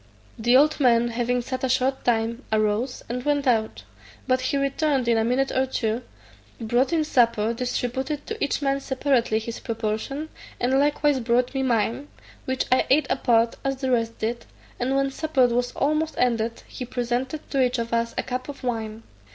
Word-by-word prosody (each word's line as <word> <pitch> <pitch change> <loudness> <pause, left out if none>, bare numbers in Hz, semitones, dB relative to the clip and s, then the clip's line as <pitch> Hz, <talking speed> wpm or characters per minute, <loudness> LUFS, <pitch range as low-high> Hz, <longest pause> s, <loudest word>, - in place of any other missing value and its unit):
The 240 +3 +5
old 305 +3 +3
man 240 -3 +4
having 240 +1 -1
sat 260 +1 -4
a 260 - +1
short 260 +1 +1
time, 230 +1 0
arose, 215 +4 0
and 245 +1 -4
went 290 0 +1
out; 225 -4 +1 0.4
but 255 -1 +1
he 255 +2 0
returned 275 -1 0
in 235 - +4
a 225 - +2
minute 255 +4 +1
or 260 0 +1
two, 225 -2 -1 0.6
brought 240 +5 +1
in 325 -2 +2
supper, 230 -5 +2
distributed 250 +4 -3
to 445 -1 -4
each 285 - -1
man 275 0 +1
separately 265 -4 +1
his 225 +1 -5
proportion, 230 +6 -3 0.3
and 260 +2 +2
likewise 290 -1 +2
brought 245 +2 +1
me 270 - -1
mine, 240 +2 0 0.4
which 260 0 -1
I 255 - +3
ate 300 +3 +4
apart, 235 -3 +2
as 270 0 0
the 260 -1 -2
rest 230 -2 0
did; 230 +2 -3 0.3
and 260 +2 0
when 275 0 +1
supper 310 -3 +2
was 245 0 0
almost 310 +2 0
ended, 230 -2 0
he - - -7
presented 250 +4 -3
to 275 - +2
each 250 0 +1
of 230 0 -3
us 230 0 0
a - - 0
cup 255 +2 -4
of 280 - -8
wine. 225 -2 -3
250 Hz, 185 wpm, -24 LUFS, 230-270 Hz, 0.6 s, The